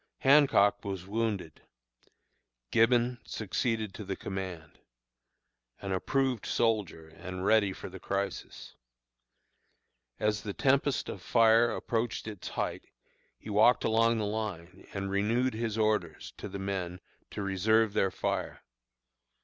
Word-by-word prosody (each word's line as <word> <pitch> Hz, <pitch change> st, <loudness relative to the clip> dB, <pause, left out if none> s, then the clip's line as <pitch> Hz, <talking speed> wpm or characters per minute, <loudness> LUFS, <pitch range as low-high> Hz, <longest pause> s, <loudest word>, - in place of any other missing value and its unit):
"Hancock 135 Hz, -8 st, +5 dB
was 95 Hz, -3 st, -5 dB
wounded; 105 Hz, -6 st, -3 dB, 1.1 s
Gibbon 120 Hz, +1 st, +3 dB
succeeded 110 Hz, 0 st, -2 dB
to 110 Hz, -, -7 dB
the 95 Hz, -1 st, -4 dB
command 95 Hz, -6 st, -6 dB, 1.0 s
an 100 Hz, -, -5 dB
approved 130 Hz, +4 st, 0 dB
soldier, 105 Hz, -9 st, 0 dB
and 90 Hz, +3 st, -7 dB
ready 105 Hz, -2 st, +4 dB
for -, -, -8 dB
the 95 Hz, 0 st, -9 dB
crisis. 100 Hz, 0 st, -4 dB, 1.5 s
As 105 Hz, 0 st, 0 dB
the 100 Hz, -2 st, -5 dB
tempest 140 Hz, 0 st, +2 dB
of 95 Hz, -, -6 dB
fire 115 Hz, +3 st, +4 dB
approached 115 Hz, -1 st, -2 dB
its 105 Hz, -4 st, -7 dB
height, -, -, -3 dB, 0.5 s
he 105 Hz, -, -9 dB
walked 110 Hz, +4 st, +5 dB
along 115 Hz, +1 st, +3 dB
the 110 Hz, -, -1 dB
line, 100 Hz, -4 st, -5 dB
and 95 Hz, 0 st, -4 dB
renewed 115 Hz, +6 st, +1 dB
his 110 Hz, -1 st, -2 dB
orders 110 Hz, -1 st, -1 dB
to -, -, -7 dB
the -, -, -6 dB
men 95 Hz, -2 st, -3 dB, 0.3 s
to 105 Hz, -, -5 dB
reserve 105 Hz, +3 st, +2 dB
their 95 Hz, -, +2 dB
fire. -, -, -3 dB
105 Hz, 125 wpm, -30 LUFS, 95-115 Hz, 1.5 s, Hancock